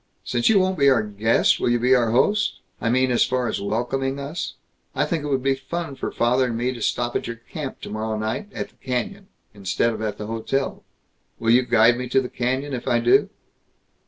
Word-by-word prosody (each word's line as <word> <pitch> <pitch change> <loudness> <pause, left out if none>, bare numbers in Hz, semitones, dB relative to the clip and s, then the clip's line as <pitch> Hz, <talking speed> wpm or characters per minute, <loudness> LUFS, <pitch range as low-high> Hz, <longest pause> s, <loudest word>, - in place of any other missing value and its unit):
Since 120 -1 +1
you 220 - +5
won't 185 -2 +1
be 140 0 +6
our 130 -5 +3
guest, 105 +2 +2
will - - +1
you 120 - +3
be 125 +2 +3
our 120 -3 +3
host 205 - +2 0.3
I 115 - 0
mean, 130 +1 +2
as 120 - +4
far 125 -1 0
as 110 - -2
welcoming 125 +6 -1
us? 145 +5 -5 0.4
I 145 +2 +2
think 155 0 -2
it - - -3
would 135 -3 0
be 135 0 +3
fun 165 +3 -5
for - - -4
father 125 +2 +2
and 115 -2 -3
me 125 +2 -1
to 120 - -9
stop 120 +2 -1
at - - -1
your 115 - -4
camp, 130 +4 -7
tomorrow 110 0 -3
night, 110 - -3
at - - -5
the - - -29
canyon, 190 +11 -3 0.3
instead 100 +3 0
of 110 - -6
at 110 -1 -3
the 105 - -5
hotel. 115 +5 -2 0.5
Will 115 0 +1
you 125 +2 +6
guide 120 -1 +4
me 125 -1 -4
to 135 - +4
the 125 -1 -3
canyon, 130 +3 -2
if 125 - -5
I 120 - +3
do?" 120 +1 +4
125 Hz, 225 wpm, -23 LUFS, 115-135 Hz, 0.5 s, be